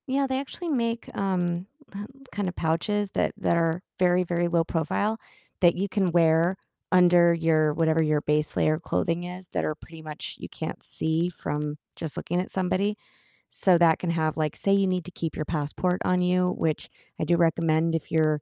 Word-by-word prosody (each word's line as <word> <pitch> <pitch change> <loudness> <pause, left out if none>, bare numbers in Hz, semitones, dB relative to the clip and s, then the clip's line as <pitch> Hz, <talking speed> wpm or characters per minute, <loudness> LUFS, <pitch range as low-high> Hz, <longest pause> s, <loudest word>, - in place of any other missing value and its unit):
Yeah, 275 +1 +1
they 260 0 -1
actually 330 +5 -6
make, 235 -5 -1
um, 180 -2 -1 0.2
po 200 +1 -6 0.3
kind 205 -2 -2
of 180 - -4
pouches 195 +5 0
that - - 0
that 170 - +1
are 165 +1 +1 0.2
very, 180 0 +4
very 175 0 0
low 170 -1 +2
profile 180 +7 -1 0.4
that 175 -2 +5
you 195 +3 -1
can 200 0 +1
wear 165 +1 +4 0.4
under 175 -1 +6
your 160 -2 +2
whatever 160 0 +2
your 150 -1 +1
base 150 0 0
layer 155 0 +2
clothing 170 0 -1
is, 180 +1 -8
that - - 0
are 155 - -1
pretty 160 +1 -13
much 155 -1 -7
you - - -7
can't - - -6
see 160 +2 -1
from 150 -3 -4 0.2
just 160 -3 -6
looking 175 +1 -1
at 185 - -7
somebody, 195 +3 0 0.6
so, 185 -3 +4
that 165 -2 +5
can 175 - -1
have, 160 -2 0
like 155 -2 -1
say 195 - 0
you 195 -1 +3
need 185 -1 0
to 180 - -8
keep 165 -2 -4
your - - -2
passport 165 +4 -1
on 180 0 +2
you, 180 0 +2
which 160 -2 -1 0.3
I - - 0
do 175 - +3
recommend 165 -1 +2
if 165 - -4
you're 155 -2 +2
170 Hz, 195 wpm, -26 LUFS, 160-185 Hz, 0.6 s, under